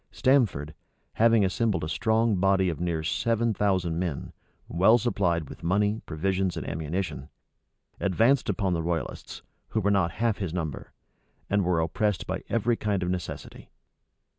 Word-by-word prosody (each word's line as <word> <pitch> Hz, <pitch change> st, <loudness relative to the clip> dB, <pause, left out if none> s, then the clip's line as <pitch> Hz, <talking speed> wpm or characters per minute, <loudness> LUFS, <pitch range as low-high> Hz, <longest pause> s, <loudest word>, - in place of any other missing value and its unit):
Stamford, 110 Hz, -, +1 dB, 0.4 s
having 115 Hz, -2 st, +4 dB
assembled 105 Hz, +1 st, 0 dB
a -, -, -2 dB
strong 110 Hz, +7 st, +1 dB
body 95 Hz, 0 st, +3 dB
of 80 Hz, -, -4 dB
near 85 Hz, -2 st, -1 dB
seven 115 Hz, +7 st, +1 dB
thousand 95 Hz, -5 st, 0 dB
men, 85 Hz, -6 st, -3 dB, 0.3 s
well 95 Hz, +7 st, +5 dB
supplied 90 Hz, -, 0 dB
with -, -, -11 dB
money, 105 Hz, +5 st, +1 dB
provisions, 95 Hz, +3 st, -1 dB
and -, -, -5 dB
ammunition, 80 Hz, -3 st, -3 dB, 0.7 s
advanced 115 Hz, +8 st, +2 dB
upon 95 Hz, -4 st, 0 dB
the 85 Hz, -, 0 dB
royalists, 80 Hz, -3 st, -4 dB, 0.2 s
who 110 Hz, -, -1 dB
were 100 Hz, 0 st, +1 dB
not 95 Hz, -4 st, +2 dB
half 115 Hz, -2 st, 0 dB
his 90 Hz, -4 st, -3 dB
number, 80 Hz, -6 st, -4 dB, 0.6 s
and 100 Hz, 0 st, +3 dB
were 90 Hz, -2 st, +1 dB
oppressed 90 Hz, +5 st, 0 dB
by -, -, -4 dB
every 115 Hz, +1 st, +1 dB
kind 100 Hz, -3 st, -1 dB
of 90 Hz, -, -1 dB
necessity. 90 Hz, -2 st, -6 dB
95 Hz, 150 wpm, -27 LUFS, 85-110 Hz, 0.7 s, well